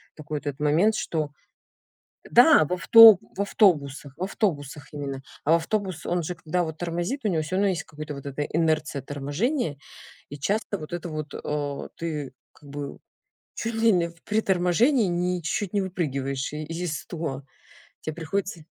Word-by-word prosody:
такой 155 -1 -5
вот 145 - -7
это 145 +1 -4
момент, 170 +9 +3
что 155 -7 -2 1.0
да, 270 - +7
в 150 - -5
авто 220 +3 +9 0.2
в - - -4
автобусах, 150 - +2
в 170 - -7
автобусах 150 - -2
именно. 140 -2 -5 0.2
А 155 - +3
в - - +8
автобус, 185 0 -1
он 175 0 0
же, 180 - -3
когда 175 +1 -1
вот 160 -1 -6
тормозит, 175 - -3
у - - +2
него 165 -5 +1
всё 155 +4 -3
равно 200 +1 +3
есть 180 -4 -1
какая-то 150 0 -7
вот 140 0 -9
это 140 +1 -3
инерция 155 -2 0
торможения, 145 - -2 0.5
и 145 - -7
часто 205 +6 -1
вот 155 +1 -9
это 175 0 -4
вот, 155 -2 -5
э, 145 -1 -4
ты 150 -5 -4 0.2
как 145 - -18
бы 140 0 -6 0.6
чуть 230 0 -3
ли 225 0 +4
не 175 -3 +2
в 170 0 -20
при 210 +1 +1
торможении 200 - +3
н 175 -1 -1
ни 180 0 0
чуть-чуть 175 +3 -2
не 205 - +2
выпрыгиваешь 140 -7 -2
из 160 +1 -4
стула. 155 -6 -5 0.6
Тебе 155 - -4
приходится 170 +1 -3
165 Hz, 175 wpm, -25 LUFS, 145-190 Hz, 1.0 s, авто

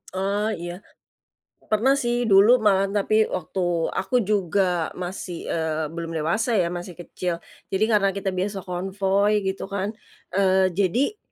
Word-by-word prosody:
Eee, 200 +2 0 0.2
iya. 175 0 -5 0.9
Pernah 240 +6 +3
sih 240 -2 0
dulu 210 +6 +7
malahan 195 -2 +3
tapi 215 +2 +3
waktu 175 -1 -1
aku 250 -1 0
juga 185 -4 0
masih, 180 -1 -6
eee, 160 -1 -1
belum 165 0 -5
dewasa 170 +10 0
ya 180 -5 +2
masih 175 +1 -6
kecil. 175 0 -4 0.3
Jadi 195 +3 +2
karena 200 -3 +3
kita 195 -1 -2
biasa 190 +1 -3
konvoi 195 +3 0
gitu 190 0 -3
kan. 200 0 -2 0.4
Eee, 190 -1 +3
jadi 200 - +1
195 Hz, 140 wpm, -24 LUFS, 175-205 Hz, 0.9 s, dulu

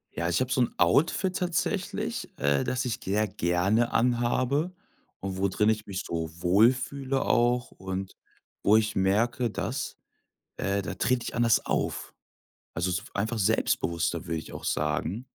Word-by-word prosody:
Ja, 85 +2 -1
ich 85 - +1
habe 130 0 -1
so 130 - +2
'n 120 - +1
Outfit 180 +5 +2
tatsächlich, 180 -3 -2
äh, 70 0 +2
das 125 0 -1
ich 120 -3 -2
sehr 105 +3 +1
gerne 95 +6 +1
anhabe 125 +6 +1 0.5
und 95 -1 -4
wo 100 - +3
drin 105 +3 +2
ich 110 -1 -1
mich 95 -1 -4
so 80 -1 -3
wohl 100 +7 +5
fühle 135 +1 -2
auch 120 +1 +2
und 95 0 -5 0.5
wo 105 +2 +5
ich 110 -1 0
merke, 115 +6 +2
dass 115 +6 -4 0.6
äh, 100 0 0
da 95 - -5
trete 125 +1 0
ich - - -5
anders 115 -1 +3
auf. - - -2 0.6
Also, 85 +2 0
so 90 +2 -1
einfach 110 +3 -1
selbstbewusster, 85 -4 0
würde 80 - -2
ich - - -11
auch - - -8
sagen. 80 +9 -1
110 Hz, 160 wpm, -28 LUFS, 95-125 Hz, 0.6 s, wohl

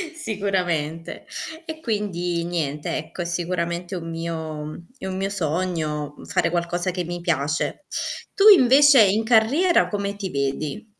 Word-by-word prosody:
Sicuramente. 180 - -2 0.4
E 320 -2 -6
quindi 180 - -1
niente 150 -4 -2
ecco, 155 +3 -6
è - - -2
sicuramente 175 +1 -2
un 165 -2 -5
mio 165 -1 -4
mhmm, 155 +3 -9
è 190 - -8
un 185 0 -3
mio 195 +1 -1
sogno 160 -5 -2
fare 170 -1 +1
qualcosa 175 +1 -1
che 180 0 -3
mi 175 0 -5
piace. 155 -2 -1 0.5
Tu 420 +1 +7
invece 280 - +8
in 205 +3 +2
carriera 250 +11 +4
come 200 -1 -3
ti 200 -2 -4
vedi? 140 +9 -3
175 Hz, 140 wpm, -23 LUFS, 165-205 Hz, 0.5 s, invece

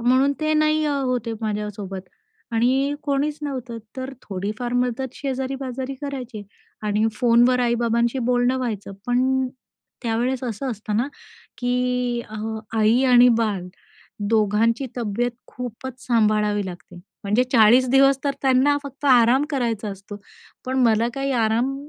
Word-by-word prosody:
म्हणून 260 +4 +3
ते 310 0 +1
नाही 310 0 +2
अ, 295 - +1
होते 250 -3 -1
माझ्यासोबत 205 -3 -4 0.4
आणि 260 +5 +2
कोणीच 290 +1 -1
नव्हतं. 255 -5 -4 0.2
तर 260 +1 -5
थोडीफार 210 +5 -4
मदत 250 +1 -1
शेजारी-पाजारी 265 -1 -4
करायचे 255 -7 -5 0.4
आणि 210 +1 +1
फोनवर 245 +2 +4
आई-बाबांशी 235 +1 +1
बोलणं 245 +1 +2
व्हायचं. 215 -6 -4
पण 260 +1 +1 0.5
त्यावेळेस 245 +2 -1
असं 250 +3 -3
असतं 210 -1 -3
ना, 240 +4 +1 0.5
की 250 -1 0
अ, 215 - -8 0.4
आई 220 +4 +4
आणि 250 -1 +7
बाळ 210 -5 0 0.7
दोघांची 225 +3 +2
तब्येत 240 +1 -1 0.2
खूपच 250 +1 -8
सांभाळावी 210 -3 +2
लागते. 180 0 -10 0.3
म्हणजे 210 +5 +2
40 240 +2 +6
दिवस 275 0 +5
तर 280 - +1
त्यांना 270 +2 +4
फक्त 280 +1 -10
आराम 250 +1 +5
करायचा 230 -6 -1
असतो, 200 +1 -9 0.5
पण 260 +1 -1
मला 225 0 +3
काही 275 0 -1
आराम 235 +3 +1
245 Hz, 130 wpm, -23 LUFS, 220-265 Hz, 0.7 s, आणि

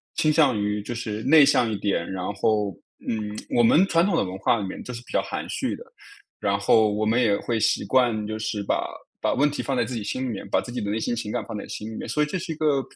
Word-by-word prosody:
倾 155 - +3
向 140 -7 +4
于 105 0 -1
就 120 +3 -5
是 110 -2 -4
内 155 -3 +7
向 125 -5 +3
一 110 - -1
点， 100 -5 -1
然 95 -1 -4
后， 105 -1 +1 0.4
嗯， 105 -1 -2 0.2
我 120 - +5
们 155 +11 +5
传 170 0 +3
统 200 - +1
的 - - +2
文 95 0 -5
化 115 - +2
里 100 - -3
面 95 - -6
就 125 - -7
是 120 - -6
比 - - -13
较 - - +2
含 - - -5
蓄 - - -2
的。 - - -11 0.6
然 100 0 +1
后 110 +2 +4
我 110 +1 0
们 115 +3 +2
也 105 -4 +3
会 115 -2 -1
习 110 - +2
惯 120 -5 +2
就 110 +1 -4
是 105 -1 -2
把 - - 0 0.3
把 - - +1
问 145 +2 +2
题 145 - -3
放 135 - -2
在 125 - +2
自 130 - -5
己 115 - -3
心 130 +5 -3
里 130 - -2
面， 105 - -6
把 - - +2
自 120 - -8
己 125 - -3
的 100 - -3
内 105 - 0
心 115 +2 -1
情 115 -3 -4
感 - - -2
放 110 -2 -6
在 - - -7
心 110 +1 -6
里 - - -7
面， - - -6
所 150 +7 +1
以 - - +2
这 175 +5 -3
是 170 -1 -4
一 - - -9
个 150 -3 +2
115 Hz, 315 characters per minute, -24 LUFS, 105-130 Hz, 0.6 s, 内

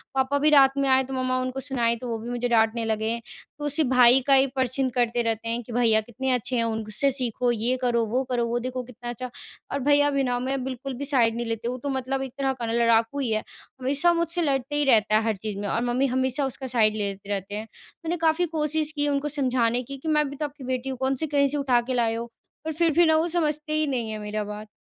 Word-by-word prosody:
पापा 265 +2 +2
भी 305 +1 +4
रात 275 -2 +6
में 275 0 +1
आए 260 0 +5
तो 265 +1 -7
मम्मा 255 0 0
उनको 255 +1 -3
सुनाई 240 -4 0
तो 250 - -5
वो 225 - -2
भी 235 +2 -7
मुझे 245 0 -1
डाँटने 225 0 +2
लगे। 220 +1 -1 0.4
तो 295 - -4
उसी 290 +2 +1
भाई 250 0 +6
का 275 - +5
ही 270 0 +5
परचीन 260 0 0
करते 240 0 +2
रहते 230 0 -2
हैं 235 +1 -1
कि 235 - -9
भैया 225 -3 +3
कितने 255 +4 -3
अच्छे 250 +1 -2
हैं 230 - +2
उनसे 225 +4 -1
सीखो 250 -2 -1
ये 235 +2 0
करो, 235 -2 +1
वो 250 +5 0
करो, 240 -1 +1
वो 240 +1 -1
देखो 255 +1 -4
कितना 240 0 -9
अच्छा 250 +1 -5 0.4
और 280 - -1
भैया 290 +1 +4
भी 275 -1 +1
ना 245 -1 0
मैं 260 +1 -2
बिल्कुल 265 +1 -5
भी 285 - -4
साइड 240 -5 +2
नहीं 240 0 -3
लेते 225 +1 -3
वो 250 +1 -2
तो 285 - -2
मतलब 265 0 -2
एक 265 -2 -5
तरह 270 -1 0
का - - -1
लड़ाकू 230 +3 +2
ही 245 -5 -1
है 215 0 0 0.4
हमेशा 285 +7 +2
मुझसे 340 +1 -1
लड़ते 275 -1 0
ही 295 - +2
रहता 215 -4 +4
है 215 - +3
हर 220 -2 +1
चीज़ 210 -2 -4
में 205 - -3
और 230 +4 0
मम्मी 250 +3 +1
हमेशा 260 +2 0
उसका 265 0 -5
साइड 220 -3 +2
लेते 200 -1 -4
रहते 200 0 -3
हैं 220 +1 -5 0.4
मैंने 345 +2 -1
काफ़ी 325 +2 +2
कोशिश 310 -1 -1
की 290 0 +1
उनको 285 +1 0
समझाने 250 -4 0
कि, 275 +3 -8
कि 315 - -9
मैं 300 -2 +2
भी 280 - -8
तो 300 - -2
आपकी 285 -1 -9
बेटी 255 +1 -3
हूँ। 260 - -4
कौन 265 +1 0
से 315 +4 -3
कहीं 280 -1 +3
से 290 +2 -2
उठा 255 -4 +2
के - - +1
लाए 230 -2 +1
हो? 230 - -3 0.4
पर 320 - -1
फ़िर 330 +1 +2
भी 345 +2 +5
ना 315 0 +4
वो 330 +2 +1
समझते 305 -2 -1
ही 310 -1 +1
नहीं 240 -5 -2
है 215 - -4
मेरा 210 0 -3
बात। 210 +1 -7
255 Hz, 260 wpm, -25 LUFS, 230-280 Hz, 0.4 s, रात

